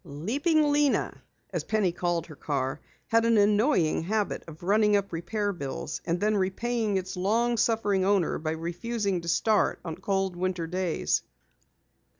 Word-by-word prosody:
"Leaping 290 - +1
Lena," 290 -1 +2 0.4
as - - -2
Penny 210 -5 +1
called 175 -1 -1
her 155 - -11
car, 135 -3 -2 0.3
had 230 0 +4
an 230 -1 +3
annoying 205 - +3
habit 205 +4 -1
of 160 0 -11
running 210 +2 +3
up 200 -2 -1
repair 205 +5 -2
bills, 145 -1 -5
and 170 +1 0
then 215 +2 +1
repaying 210 +2 0
its 185 0 -4
long 225 +6 +1
suffering 205 -4 +1
owner 195 -3 +2
by 155 - -3
refusing 180 +4 -2
to 170 - -9
start 215 +5 +2
on 160 -2 -4
cold 195 0 -1
winter 180 -1 -2
days. 180 0 0
195 Hz, 155 wpm, -27 LUFS, 170-220 Hz, 0.4 s, had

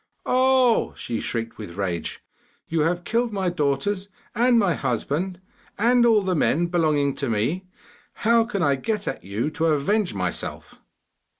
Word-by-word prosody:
'Oh,' 255 -2 +3
she 115 - -4
shrieked 115 -1 -4
with 95 -4 -8
rage, 90 -4 -3 0.4
'you 165 - -1
have 170 +3 +1
killed 235 +4 0
my 190 -3 -1
daughters 175 +5 -1 0.2
and 240 +1 +3
my 195 -6 +3
husband, 175 +5 -2 0.4
and 240 +2 +4
all 215 -3 +4
the 185 -1 0
men 170 +1 +2
belonging 155 -5 +1
to 140 - -3
me; 135 - -1 0.6
how 230 0 +5
can 205 -5 -2
I 140 -2 +2
get 210 +8 -3
at - - -4
you 105 +10 -2
to 165 +1 0
avenge 165 - +1
myself? 90 -2 -4
175 Hz, 155 wpm, -24 LUFS, 140-215 Hz, 0.6 s, how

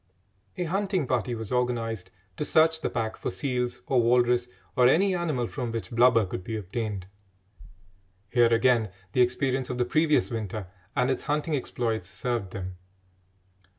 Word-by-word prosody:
A 180 - 0
hunting 190 -1 0
party 125 -1 0
was 110 -2 -6
organised 115 -5 -1 0.3
to - - -2
search 160 +1 +3
the - - -1
pack 110 -2 -2
for - - -3
seals 125 +4 -2
or 130 -3 +3
walrus 120 +1 +3 0.3
or 125 -1 +6
any 190 +8 +4
animal 155 -9 -1
from 120 -1 -4
which 115 +1 -5
blubber 115 -2 +5
could 90 0 -5
be 110 +3 -3
obtained. 105 -1 -4 1.3
Here 120 -1 +4
again 115 -2 +3 0.2
the 125 - +3
experience 130 +1 +1
of 125 - -3
the 125 - +1
previous 155 +1 +2
winter 110 -3 -4 0.3
and 125 +1 +2
its - - -2
hunting 150 +1 0
exploits 115 -7 -2
served 120 -5 -2
them. 95 -1 -6
125 Hz, 155 wpm, -27 LUFS, 115-135 Hz, 1.3 s, or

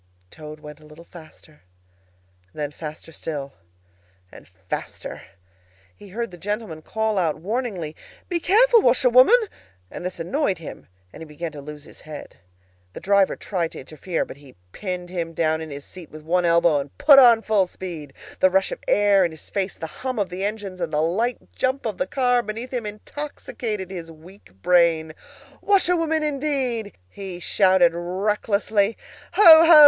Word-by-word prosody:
Toad 155 0 -10
went 150 0 -11
a 155 - -17
little 155 +3 -14
faster; 155 -2 -16 0.9
then 150 -1 -3
faster 155 +1 -9
still, 145 -4 -6 0.8
and - - -14
faster. 95 0 -7 0.7
He 205 - -14
heard 230 +2 -4
the 175 - -12
gentlemen 205 -5 -4
call 220 +3 -1
out 160 -4 0
warningly, 190 -4 -3 0.3
"Be 350 -2 0
careful, 455 +6 +5
washerwoman!" 255 - +6 0.5
And - - -7
this 180 -1 -5
annoyed 195 - 0
him, 160 - -10 0.3
and - - -11
he - - -7
began 155 +2 -6
to 145 - -9
lose 150 0 -9
his - - -14
head. 155 -1 -10 0.6
The - - -7
driver 200 0 +3
tried 175 -5 -3
to - - -8
interfere, 160 +5 -4
but - - -11
he 140 -3 -17 0.2
pinned 180 - -5
him 170 -2 -3
down 160 -1 +1
in 160 - -7
his 140 0 -8
seat 180 -4 -11
with 155 0 -12
one 175 +3 +1
elbow, 170 -3 +4
and 140 0 -8
put 280 -2 +8
on 235 -3 +7
full 205 -4 +2
speed. 170 -6 -8 0.3
The 185 - +5
rush 190 +1 +1
of - - -5
air 205 -1 +4
in 175 - +1
his 160 -1 -11
face, 195 -1 -2
the - - -5 0.2
hum 255 -1 -3
of 200 -4 -1
the 180 +2 -4
engines, 200 -3 -4
and 165 -2 -2
the 150 - 0
light 200 +10 -1
jump 260 +1 -1
of 215 -4 -3
the 275 - 0
car 245 -2 +2
beneath 230 +3 -6
him 235 -4 -2
intoxicated 210 -4 -6
his 170 -3 -7
weak 165 - -16
brain. 165 -3 +3 0.5
"Washerwoman, 340 -5 +2
indeed!" 270 -7 -2
he 185 - -8
shouted 185 -2 +3
recklessly. 200 +4 0 0.4
"Ho! 420 - +3 0.2
ho! 325 -2 +9
185 Hz, 170 wpm, -23 LUFS, 160-225 Hz, 0.9 s, ho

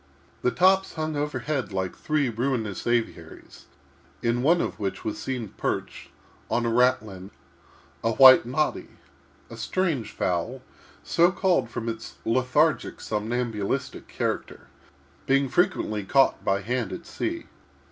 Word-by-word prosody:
These 125 - +1
tops 190 +1 +3
hung 155 -1 -2
overhead 145 -2 -2
like 95 -1 -3
three 150 -3 0
ruinous 115 -4 -2
aviaries, 115 -9 -3 0.6
in 120 +1 +1
one 165 +6 +4
of - - -3
which 100 -2 -4
was 105 -1 -3
seen, 125 -5 -4
perched, - - -4 0.4
on 120 - 0
a 115 - +1
ratlin, 110 -6 +1 0.7
a 115 0 +1
white 130 +2 +9
noddy, 135 +6 -1 0.6
a - - -7
strange 155 - -1
fowl, 105 +9 -2 0.4
so 170 +2 +3
called 185 - +1
from 115 -1 -5
its 115 0 -5
lethargic, 130 +6 +1
somnambulistic 110 -1 -3
character, - - -4 0.6
being 140 0 +3
frequently 130 - 0
caught 135 +7 +3
by 95 0 +1
hand 120 +2 -2
at 170 - -7
sea. 335 - -4
125 Hz, 125 wpm, -25 LUFS, 110-150 Hz, 0.7 s, white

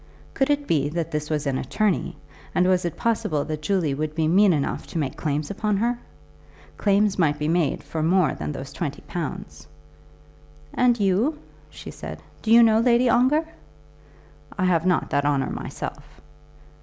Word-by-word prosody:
Could 270 - +1
it 290 0 +1
be 145 - +1
that 165 +1 -3
this 150 0 -3
was 150 -1 -1
an 135 -2 0
attorney, 200 - -1 0.4
and 180 - +3
was 185 -1 +2
it 170 - -3
possible 215 -11 0
that 155 -1 -4
Julie 165 -3 0
would 155 +2 -3
be 160 -1 +1
mean 195 +4 +5
enough 145 -4 -2
to - - -6
make 140 -5 -2
claims 150 +1 -2
upon 210 0 -1
her? 235 +3 0 0.8
Claims 205 -1 +2
might 150 -4 +2
be 150 0 -2
made 165 -2 0
for 160 - -4
more 170 -2 +3
than 75 -1 -5
those 135 - -7
twenty 145 -3 -4
pounds. 170 - -6 1.1
"And 245 -2 +3
you," 210 +10 +1 0.3
she - - -10
said, - - -8 0.2
"do 220 - -5
you 235 +1 +8
know 220 -1 +5
Lady 240 +1 +3
Ongar?" 265 +7 +3 1.1
"I 185 - +1
have 180 -1 +2
not 180 - +1
that 145 - +1
honour 140 -2 0
myself." - - -6
175 Hz, 170 wpm, -24 LUFS, 150-215 Hz, 1.1 s, you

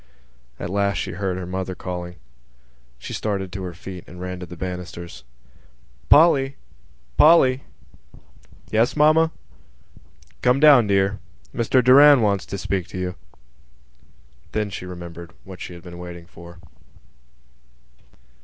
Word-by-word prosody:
At 90 - -5
last 100 0 0
she - - -3
heard 95 0 -3
her 95 - -5
mother 95 +1 -4
calling. 90 -1 -6 0.8
She - - -8
started 100 -3 -3
to 95 +1 -6
her 90 -2 -6
feet 90 0 -9
and 90 - -12
ran 90 0 -5
to 90 - -8
the 90 +1 -11
banisters. 90 -4 -7 0.9
"Polly! 140 -4 +5 0.6
Polly!" 135 -5 +5 1.1
"Yes, 115 +2 +2
mamma?" 155 +2 +4 1.1
"Come 125 +2 +3
down, 140 -7 +7
dear. 100 0 +1 0.3
Mr 125 +2 +2
Doran 140 +1 +7
wants 100 -2 0
to 100 - -5
speak 95 -1 -3
to - - -8
you." 90 0 -3 1.4
Then 105 -1 -2
she 90 - -7
remembered 85 -1 -9
what 95 -1 -11
she 90 - -7
had 85 - -13
been 85 -1 -10
waiting 85 -1 -9
for. 85 -1 -14
95 Hz, 130 wpm, -22 LUFS, 90-120 Hz, 1.4 s, down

